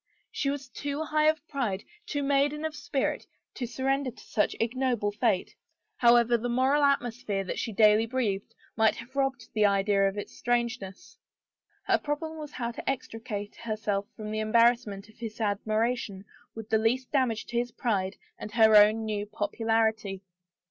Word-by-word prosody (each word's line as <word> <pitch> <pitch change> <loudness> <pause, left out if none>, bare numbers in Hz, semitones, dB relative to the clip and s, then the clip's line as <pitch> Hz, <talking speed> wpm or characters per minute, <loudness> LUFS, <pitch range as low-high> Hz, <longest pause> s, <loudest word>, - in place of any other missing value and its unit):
She 275 - -1
was 275 -1 -4
too 285 +3 -4
high 305 0 +2
of 310 0 +1
pride, 230 -9 -2 0.2
too 290 -1 -2
maiden 285 +2 +1
of 315 -1 -3
spirit 275 -2 -2 0.3
to 245 - -4
surrender 270 +2 0
to 235 - -13
such 210 - 0
ignoble 240 -2 0
fate, 210 -2 0 0.4
however 235 0 +5
the 240 +2 -3
moral 260 +4 +3
atmosphere 245 -7 +1
that 185 - -4
she 230 - -2
daily 215 +1 +5
breathed, 230 -3 -2 0.2
might 220 -1 +3
have 245 +3 -11
robbed 270 -4 -1
the 215 -1 +4
idea 200 0 +3
of 195 - -9
its 205 - -6
strangeness. 235 -5 -2 0.6
Her - - +2
problem 315 +2 -4
was 300 -1 -8
how 235 -1 -3
to 235 - -4
extricate 225 -5 -4
herself 210 -3 -2
from 215 -1 -6
the 215 - -2
embarrassment 215 -2 +2
of 220 - -21
his 225 -1 -6
admiration 215 -1 -1 0.3
with 225 -1 -8
the 220 - +4
least 245 +4 0
damage 255 -6 +1
to 240 - -4
his 240 0 -2
pride 195 -6 -1 0.2
and 210 - -7
her 220 -2 +6
own 215 +2 +6
new 210 -1 -2
popularity. 220 -1 0
230 Hz, 165 wpm, -28 LUFS, 210-260 Hz, 0.6 s, her